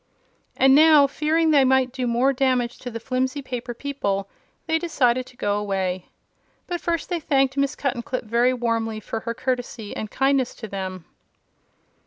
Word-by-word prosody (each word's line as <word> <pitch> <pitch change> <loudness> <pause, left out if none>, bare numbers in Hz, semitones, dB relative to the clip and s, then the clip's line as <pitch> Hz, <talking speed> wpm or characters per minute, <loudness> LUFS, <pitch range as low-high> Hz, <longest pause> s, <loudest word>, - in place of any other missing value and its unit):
And 265 0 +5
now, 305 0 +7
fearing 315 +3 +1
they 285 -3 +5
might 260 -1 +3
do 255 -1 -3
more 245 +4 +2
damage 255 -2 0
to 250 - -6
the 230 -1 -6
flimsy 260 +3 -2
paper 245 -2 -5
people, 200 -9 -2 0.4
they 320 0 +1
decided 255 -7 +1
to 250 - -17
go 205 0 0
away. 190 -3 -2 0.6
But 350 -1 -4
first 335 -2 -1
they 350 -2 -1
thanked 270 -3 +1
Miss 280 +1 0
Cuttenclip 255 -1 -3
very 235 +3 +2
warmly 230 -3 -1
for 220 +1 -5
her 230 +1 -5
courtesy 245 -4 -3
and 215 - -5
kindness 270 0 +1
to 220 - -8
them. 190 -3 -6
255 Hz, 165 wpm, -23 LUFS, 230-275 Hz, 0.6 s, now